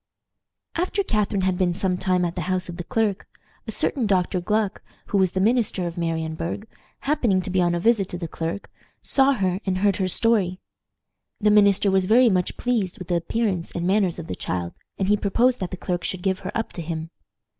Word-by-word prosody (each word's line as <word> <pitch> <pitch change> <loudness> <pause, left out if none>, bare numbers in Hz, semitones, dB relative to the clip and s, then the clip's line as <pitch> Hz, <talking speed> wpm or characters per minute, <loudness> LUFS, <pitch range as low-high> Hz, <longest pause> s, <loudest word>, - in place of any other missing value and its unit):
After 370 +4 0
Catharine 210 - 0
had 185 -1 0
been 175 -2 +2
some 185 -1 +1
time 180 -1 +1
at 170 - -2
the 180 - -4
house 185 0 0
of 170 - -6
the 175 - -4
clerk, 220 -1 -1 0.4
a - - -3
certain 255 -7 0
Dr. 185 -2 +1
Gluck, 210 +2 0 0.3
who 200 - +2
was 185 -2 +2
the 190 - 0
minister 215 -3 +1
of 170 -1 -4
Marienburg, 165 +3 -3 0.3
happening 245 -10 +2
to 185 - -4
be 185 0 +2
on 175 0 +2
a - - -1
visit 210 -1 +2
to 180 - -4
the 170 -1 -4
clerk, 165 +5 -5 0.3
saw 270 0 +4
her 190 -6 0
and 185 -2 -1
heard 200 0 +2
her 190 -3 0
story. 190 -2 +2 0.8
The 210 0 +3
minister 200 -1 +5
was 190 -1 +3
very 235 +5 +5
much 180 -3 0
pleased 225 -7 -1
with 185 - -9
the 175 - +2
appearance 185 0 -1
and 175 0 -2
manners 190 -2 +2
of 170 - -6
the - - -5
child, 90 -1 -3 0.2
and 190 - 0
he 210 - +4
proposed 235 +5 +2
that 185 -3 -3
the 185 - -6
clerk 175 0 -3
should 185 -1 -3
give 190 -1 0
her 185 - -5
up 225 - -3
to 175 - -5
him. 160 0 -5
190 Hz, 215 wpm, -24 LUFS, 175-210 Hz, 0.8 s, minister